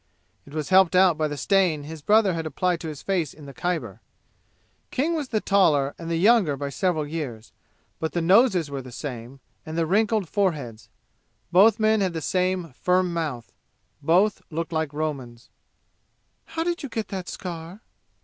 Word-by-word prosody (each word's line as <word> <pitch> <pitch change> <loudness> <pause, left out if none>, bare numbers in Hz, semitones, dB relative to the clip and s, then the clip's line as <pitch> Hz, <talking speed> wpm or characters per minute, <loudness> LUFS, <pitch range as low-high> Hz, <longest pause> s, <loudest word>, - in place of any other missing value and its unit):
It 140 - -13
was 155 -2 -3
helped 190 -1 +5
out 180 -2 +5
by 155 0 0
the 145 -1 -5
stain 180 -4 +2
his 155 +1 -8
brother 205 +2 +4
had 165 -1 -3
applied 180 +2 0
to 165 - -6
his 150 -3 -7
face 175 -7 -1
in 150 - -13
the 140 - -10
Khyber. 175 +1 -3 0.9
King 300 +6 0
was 305 -4 -2
the 220 -4 0
taller 155 -10 +3
and 165 -1 -6
the 165 - 0
younger 190 -6 +4
by 140 0 -4
several 160 0 0
years, 145 -8 -6 0.5
but 160 -1 -3
the 175 - 0
noses 185 - +4
were 140 -1 -4
the 130 -1 -11
same, 125 0 -7 0.2
and 160 +1 -6
the 165 - +2
wrinkled 210 +2 +1
fore 195 0 +1
heads; 120 -7 -9 0.6
both 200 +5 +6
men 215 -1 +3
had 185 -3 0
the 165 - -3
same 180 -3 -1
firm 180 +4 +1
mouth; 150 -8 -4 0.5
both 180 +8 +3
looked 165 0 -4
like 160 -2 -1
Romans. 140 -6 -5 0.9
"How 325 0 -3
did 345 0 -2
you 280 - -6
get 225 -2 -4
that 190 -2 -5
scar?" 175 +2 -7
170 Hz, 180 wpm, -24 LUFS, 150-195 Hz, 0.9 s, both